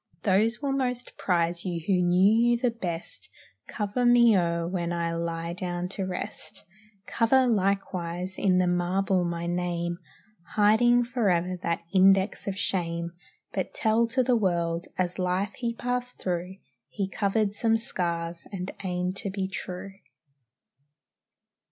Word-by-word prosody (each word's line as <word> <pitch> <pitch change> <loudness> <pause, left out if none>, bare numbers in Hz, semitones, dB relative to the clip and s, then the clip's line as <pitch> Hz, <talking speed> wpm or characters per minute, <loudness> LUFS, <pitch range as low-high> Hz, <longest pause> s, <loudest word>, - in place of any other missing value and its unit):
Those 220 +7 +2
will 280 - 0
most 250 -2 -2
prize 170 -1 0
you 175 -3 -2
who 185 -3 +2
knew 205 +7 +5
you 240 - +3
the 245 0 +1
best. 175 -7 -5 0.4
Cover 210 +3 -2
me 240 -2 +6
o'er 170 -2 +1
when 175 -1 -2
I 170 -1 -1
lie 165 0 -3
down 180 0 -3
to 195 0 -3
rest; 180 - -6 0.4
Cover, 255 +3 +3
likewise, 190 -4 -1
in 185 -2 +3
the 185 - +3
marble 180 +1 +1
my 170 0 -3
name, 175 0 -2 0.6
Hiding 240 +4 +5
forever 190 -8 0
that 170 0 -1
index 195 +2 +4
of 195 -1 -2
shame; 170 -3 -2 0.4
But - - -3
tell 225 +1 +2
to 255 +3 +1
the 250 0 +3
world, 170 -5 0
"as 180 0 -1
life 185 +3 0
he 235 -2 -2
passed 245 +1 -3
through, 180 0 -3 0.3
He 200 -3 -2
covered 200 +2 0
some 225 +1 +2
scars 170 -6 -3
and 185 -1 -4
aimed 180 0 -2
to 200 - -3
be 190 0 -2
true." 190 0 -6
190 Hz, 140 wpm, -27 LUFS, 175-220 Hz, 0.6 s, me